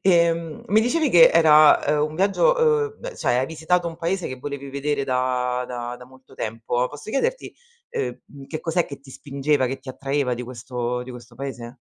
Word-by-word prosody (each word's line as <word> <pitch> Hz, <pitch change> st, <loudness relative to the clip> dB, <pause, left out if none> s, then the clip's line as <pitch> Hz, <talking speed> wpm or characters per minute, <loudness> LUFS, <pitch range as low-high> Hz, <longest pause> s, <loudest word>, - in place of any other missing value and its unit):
Ehm, 170 Hz, -3 st, +2 dB
mi 215 Hz, +3 st, +4 dB
dicevi 305 Hz, +7 st, +1 dB
che 170 Hz, -8 st, +7 dB
era, 155 Hz, -2 st, +7 dB
uhm, 150 Hz, 0 st, +2 dB
un -, -, -10 dB
viaggio, 200 Hz, -, +3 dB, 0.4 s
uhm, -, -, -27 dB
beh -, -, -7 dB
cioè 120 Hz, -, +1 dB
hai 130 Hz, -, 0 dB
visitato 170 Hz, +2 st, 0 dB
un 165 Hz, -, -9 dB
paese 175 Hz, +2 st, -2 dB
che 130 Hz, -, -6 dB
volevi 140 Hz, 0 st, -6 dB
vedere 140 Hz, 0 st, -2 dB
da 125 Hz, -1 st, 0 dB
da 120 Hz, 0 st, -5 dB
da 125 Hz, -, -13 dB
molto 130 Hz, +1 st, -19 dB
tempo, 115 Hz, +3 st, -2 dB
posso 145 Hz, +8 st, -9 dB
chiederti, 485 Hz, -, -1 dB, 0.4 s
uhm, 135 Hz, +2 st, -6 dB
che 155 Hz, -, -5 dB
cos'è 170 Hz, +1 st, 0 dB
che 140 Hz, -, -10 dB
ti 135 Hz, -1 st, -15 dB
spingeva, 140 Hz, -1 st, 0 dB
che 135 Hz, +2 st, -4 dB
ti 130 Hz, -, -15 dB
attraeva 135 Hz, -1 st, -1 dB
di 125 Hz, -, -6 dB
questo 125 Hz, 0 st, -4 dB
di 130 Hz, -, -10 dB
questo 120 Hz, -1 st, -12 dB
paese? 125 Hz, -1 st, -7 dB
140 Hz, 195 wpm, -23 LUFS, 125-165 Hz, 0.4 s, che